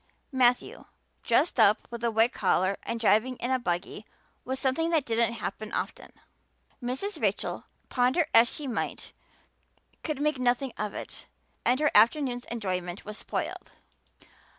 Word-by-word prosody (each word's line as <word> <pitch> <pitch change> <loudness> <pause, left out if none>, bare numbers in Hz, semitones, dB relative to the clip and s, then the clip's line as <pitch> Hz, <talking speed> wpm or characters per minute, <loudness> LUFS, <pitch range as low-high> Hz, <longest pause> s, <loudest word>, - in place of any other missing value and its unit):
Matthew, 250 -2 +2 0.4
dressed 265 +4 +2
up 215 -1 +4
with 235 0 -6
a 235 - +3
white 225 +2 +3
collar 185 0 +2
and 230 - -4
driving 225 +4 +3
in 245 +1 -3
a 260 - +2
buggy, 195 0 -3 0.4
was 260 +1 -3
something 275 +5 +1
that 320 -5 +2
didn't 230 0 +1
happen 210 0 -5
often. - - -4 0.7
Mrs. 260 +13 -3
Rachel, - - -1 0.2
ponder 255 +7 +2
as 230 +1 +6
she 300 - -5
might, 255 - -4 0.9
could 305 -4 -3
make 300 -2 0
nothing 250 +1 +1
of 210 -1 -4
it - - -8 0.4
and 250 +2 +2
her 300 0 +3
afternoon's 245 +2 +4
enjoyment 185 -5 -4
was 210 +1 -7
spoiled. - - -5
240 Hz, 145 wpm, -28 LUFS, 215-260 Hz, 0.9 s, as